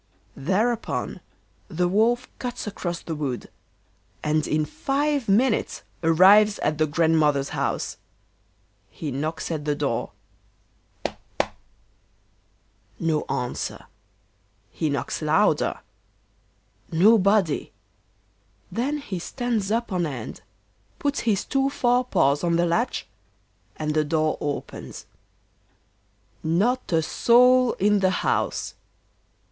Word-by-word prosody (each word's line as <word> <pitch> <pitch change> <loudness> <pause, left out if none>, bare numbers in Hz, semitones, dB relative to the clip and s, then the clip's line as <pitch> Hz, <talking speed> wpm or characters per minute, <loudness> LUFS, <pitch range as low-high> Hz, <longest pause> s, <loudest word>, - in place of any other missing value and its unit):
Thereupon 210 - -1 0.5
the 180 -1 0
Wolf 230 +6 +2
cuts 245 -1 -4
across 175 -4 -4
the 165 - -4
wood, 140 -5 -4 0.7
and 155 0 +1
in 155 0 +1
five 280 - -1
minutes 225 +4 +2 0.2
arrives 195 +6 +6
at 155 0 0
the 155 - +3
Grandmother's 150 -3 +2
house. - - -2 0.9
He 150 +7 -6
knocks 155 +6 -3
at 155 -3 -3
the 150 0 0
door: 140 -5 -2 0.9
toc, - - -4 0.2
toc. - - -1 1.5
No 160 -2 0
answer. 125 -2 -3 0.9
He 160 - -1
knocks 140 +3 -2
louder. 160 +7 +2 1.1
Nobody. 200 -1 +3 1.0
Then 270 +6 -1
he 205 -11 -5
stands 225 0 -2
up 230 0 -1
on 175 -3 0
end, 130 -6 -7 0.6
puts 285 0 -1
his 210 -4 0
two 270 0 +1
fore 250 -2 +2
paws 140 - +2
on 170 -1 +2
the 170 +1 +3
latch 225 +9 0 0.7
and 150 -1 -2
the 155 0 +2
door 155 0 0
opens. 145 -1 -5 1.4
Not 205 +12 +1
a 165 -1 +3
soul 250 +6 +4
in 205 +1 +2
the 190 -1 +3 0.2
house. - - 0
175 Hz, 110 wpm, -24 LUFS, 155-235 Hz, 1.5 s, arrives